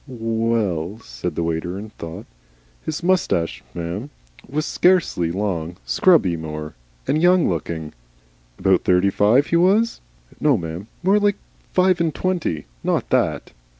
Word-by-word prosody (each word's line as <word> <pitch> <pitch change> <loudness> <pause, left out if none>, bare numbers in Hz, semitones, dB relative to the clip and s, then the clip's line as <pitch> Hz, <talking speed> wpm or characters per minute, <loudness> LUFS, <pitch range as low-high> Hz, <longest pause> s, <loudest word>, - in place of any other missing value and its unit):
"Well," 110 - -1
said - - -5
the 85 - -1
waiter, 85 +2 -2
and 105 +2 -9
thought. 80 0 -8 0.6
"His 160 +1 -4
moustache, 135 - +1
m'm, 85 +10 -4 0.4
was 150 +3 -1
scarcely 175 - +2
long 90 -3 -2
scrubby 145 - +4
more, 75 -1 -6 0.3
and 155 - +2
young 180 0 +5
looking." 80 -2 -3 0.6
"About 95 -2 +2
thirty 90 +2 +3
five, 110 +9 +4
he 170 - +2
was?" 200 +7 +3 0.4
"No, 145 -5 +3
m'm. 85 +3 -6 0.2
More 195 +3 +4
like 205 -1 +2 0.3
five 185 -1 +3
and 160 -3 0
twenty. 170 - -1 0.2
Not - - -1
that." - - +1
105 Hz, 135 wpm, -21 LUFS, -, 0.6 s, young